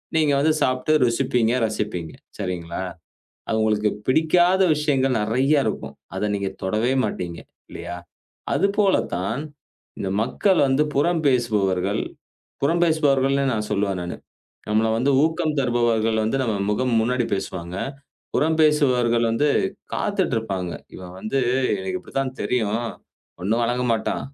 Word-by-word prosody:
நீங்க 155 -3 +3
வந்து 155 +3 +3
சாப்பிட்டு 130 +4 +1
ருசிப்பீங்க, 115 0 +1
ரசிப்பீங்க. 105 -7 -3 0.2
சரிங்களா. 90 -3 -4 0.7
அது 110 - +1
உங்களுக்கு 105 -1 +2 0.2
பிடிக்காத 175 +6 +4
விஷயங்கள் 135 -4 +1
நெறைய 130 +7 +2
இருக்கும். - - -4 0.2
அத 105 - -1
நீங்க 100 -1 -2
தொடவே 110 +6 +1
மாட்டீங்க 85 -2 -4 0.3
இல்லயா? 90 - -6 0.6
அதுபோல 200 0 +3 0.2
தான், 100 +10 -2 0.6
இந்த 95 - -2
மக்கள் 185 - +1
வந்து 135 +3 +3
புறம் 165 +3 +2
பேசுபவர்கள் 105 -5 +1 0.6
புறம் 165 +5 +2
பேசுபவர்கள்னு 140 -4 +2
நான் 105 -1 -3
சொல்லுவேன் 100 -2 0
நானு. 90 - -5 0.5
நம்பள 110 +1 +2
வந்து 130 +4 +2
ஊக்கம் 160 -1 0
தருபவர்கள் 120 -3 +1
வந்து 110 +5 0
நம்ம 110 -3 0 0.2
முகம் 125 +3 0
முன்னாடி 125 +2 +1
பேசுவாங்க. 90 -2 -5 0.6
புறம் 160 +1 +2
பேசுபவர்கள் 125 -6 +3
வந்து 115 +6 +1 0.5
காத்துக்கிட்டு - - 0
இருப்பாங்க. 95 -5 -3 0.2
"இவன் 90 -1 -9
வந்து 110 +8 -2 0.4
எனக்கு 95 0 -3
இப்படித்தான் 135 -1 -3
தெரியும். 110 -4 0 0.7
ஒண்ணும் 110 +5 +1
வேளங்க 120 +2 0
மாட்டான். 110 - -1
120 Hz, 125 wpm, -23 LUFS, 105-140 Hz, 0.7 s, பிடிக்காத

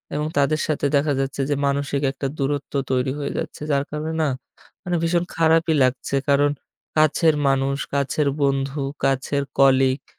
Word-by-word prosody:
এবং 150 +1 -1
তাদের 155 +2 +2
সাথে 150 -2 -1
দেখা 145 +1 +2
যাচ্ছে 135 0 -2
যে 145 - +2
মানসিক 140 0 -1
একটা 135 0 -4
দূরত্ব 140 +1 -2 0.2
তৈরি 130 +1 +1
হয়ে 140 - -3
যাচ্ছে। - - -5
যার 140 0 +2
কারণে 155 +1 -3
না 155 - +2 0.6
মানে 175 -2 -1
ভীষণ 170 +1 +1
খারাপই 165 0 +3
লাগছে। 130 +2 0
কারণ 145 +1 +4 0.5
কাছের 155 +1 +4
মানুষ, 135 0 +1 0.2
কাছের 140 +1 0
বন্ধু, 135 +1 0 0.2
কাছের 135 +1 0
colleague, 135 0 +3
140 Hz, 155 wpm, -22 LUFS, 135-155 Hz, 0.6 s, কারণ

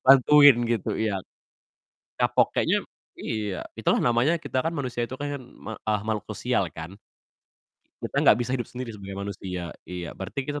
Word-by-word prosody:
bantuin 140 0 +8
gitu. 115 -4 -1
Iya. 100 -4 0 1.0
Kapok. - - +3
Kayaknya - - +3 0.4
iya, 105 -4 -3 0.2
itulah - - +2
namanya 120 +7 +3
kita 140 -5 -2
kan 165 +4 -1
manusia 125 -4 -2
itu 130 - -6
kan 145 0 -4
me 120 -3 -10
eee, 105 -1 0
makhluk 110 -2 -2
sosial - - 0
kan. 85 +5 -8 1.0
Kita - - -5
gak - - +6
bisa 120 +1 -2
hidup 120 -4 -2
sendiri 125 -2 -6
sebagai 100 -2 -8
manusia. 95 -4 -5 0.2
Iya 90 -2 -5
berarti 95 +8 -5
kita 145 +1 -3
120 Hz, 160 wpm, -26 LUFS, 100-135 Hz, 1.0 s, bantuin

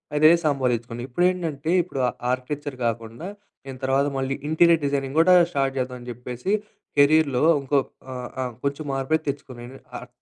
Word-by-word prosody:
అదే 155 +2 +7
సంపాదించుకున్నా. 120 -4 -1
ఇప్పుడేంటంటే 165 0 0
ఇప్పుడు 160 -6 -6
ఆహ్, - - -9 0.2
ఆర్కిటెక్చర్ 140 +2 -4
గాకుండా 115 +7 -3 0.4
నేను 135 -1 -7
తర్వాత 135 +2 +2
మళ్ళీ 135 0 -1
ఇంటీరియర్ 165 0 +4
డిజైనింగ్ 140 0 -1
గూడా 180 +3 +6 0.2
స్టార్ట్ 135 -2 0
చేద్దాం 125 0 -3
అని 120 - -12
జెప్పేసి 125 - -5 0.5
కెరియర్‌లో 145 -2 +4 0.2
ఇంకో 140 +1 +2 0.3
ఆహ్, 125 -1 -6
ఆహ్, 125 -1 -4
కొంచెం 140 +2 -2
మార్పు 135 +4 0
తెచ్చుకున్నాను. 130 -4 -6
ఏంటంటే 135 +2 -13
ఆహ్ 125 - -10
135 Hz, 155 wpm, -24 LUFS, 125-150 Hz, 0.5 s, అదే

